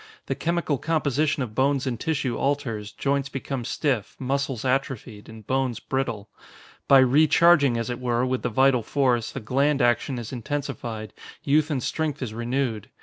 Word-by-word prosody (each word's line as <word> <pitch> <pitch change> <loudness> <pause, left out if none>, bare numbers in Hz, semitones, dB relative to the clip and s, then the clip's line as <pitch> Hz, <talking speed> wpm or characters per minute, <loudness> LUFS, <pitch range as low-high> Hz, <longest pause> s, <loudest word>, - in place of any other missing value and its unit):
The - - -1
chemical 170 -5 -1
composition 150 -2 0
of 110 -4 -7
bones 135 +2 +1
and 120 -4 -2
tissue 140 -5 -1
alters, 115 -7 -2
joints 140 +2 -1
become 135 -1 -4
stiff, 125 -4 -1
muscles 135 -2 -2
atrophied, 125 -5 -2
and 110 -1 -12
bones 130 -2 -1
brittle. 125 -6 -3 0.6
By 140 - +7
recharging, 145 +1 +5
as 115 +1 -2
it 120 - -4
were, 125 0 0
with 130 0 -1
the 125 - -1
vital 130 +1 +3
force, 125 -1 0
the - - -5
gland 135 +6 +1
action 120 +1 +1
is 120 +1 -6
intensified, 120 -5 -4 0.3
youth 150 +2 +2
and 135 -5 -1
strength 155 -3 -2
is 110 -4 -5
renewed. 120 -2 -2
130 Hz, 160 wpm, -25 LUFS, 120-140 Hz, 0.6 s, By